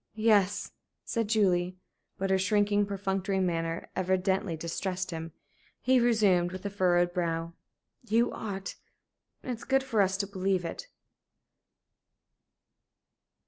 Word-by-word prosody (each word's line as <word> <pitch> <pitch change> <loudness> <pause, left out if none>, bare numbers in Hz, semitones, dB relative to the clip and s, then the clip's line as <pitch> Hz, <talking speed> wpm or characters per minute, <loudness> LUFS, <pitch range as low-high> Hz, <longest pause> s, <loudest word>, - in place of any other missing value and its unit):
"Yes," 205 -3 +2 0.3
said 230 -3 -1
Julie. 185 -4 +2 0.4
But 195 0 -1
her 190 - +3
shrinking, 205 +1 +2
perfunctory 195 -1 -1
manner 165 -2 -1
evidently 190 -1 0
distressed 180 +3 -3
him. 165 0 -5 0.5
He 260 0 +3
resumed, 205 -7 +3
with 185 +1 -8
a 200 - -2
furrowed 175 -2 +2
brow: 165 -2 -2 0.6
"You 230 +2 +3
ought. 195 -3 -5 0.7
It 255 - -4
is 235 -1 -5
good 270 0 +2
for 230 -6 +1
us 195 0 +2
to 200 - -1
believe 190 -2 -1
it." 335 - -6
190 Hz, 120 wpm, -29 LUFS, 180-205 Hz, 0.7 s, her